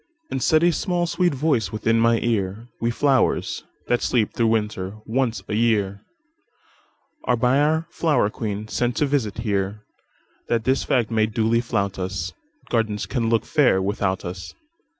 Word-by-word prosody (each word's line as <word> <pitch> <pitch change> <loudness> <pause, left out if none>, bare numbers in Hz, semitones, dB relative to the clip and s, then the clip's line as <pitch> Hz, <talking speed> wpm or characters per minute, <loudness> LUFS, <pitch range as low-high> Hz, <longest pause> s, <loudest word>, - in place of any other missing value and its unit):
And 135 - -2
said 155 +4 +3
a 175 - +5
small, 175 +1 0
sweet 175 -2 +1
voice 130 - +1
within 115 +1 +1
my 115 0 +4
ear:"We 115 +2 -2
flowers, 135 +2 +1 0.2
that 120 - +1
sleep 115 -4 +1
through 115 - +1
winter, 105 -3 -1
once 120 0 0
a - - -6
yearAre 105 -3 +1 1.4
by 125 +3 +3
our 160 +2 +2
flower 135 -11 +1
queen 105 -1 -4
sent 120 +2 -1
to 150 - +2
visit 135 -8 -1
here, 105 -2 -2 0.6
That 115 -1 0
this 130 +2 +1
fact 120 -3 +1
may 110 -1 +2
duly 115 +1 +1
flout 100 -5 -2
us,—Gardens 105 - -3
can 115 -4 -1
look 115 -1 +2
fair 145 -11 +3
without 95 -1 -1
us. 90 +1 -7
115 Hz, 150 wpm, -23 LUFS, 105-130 Hz, 1.4 s, a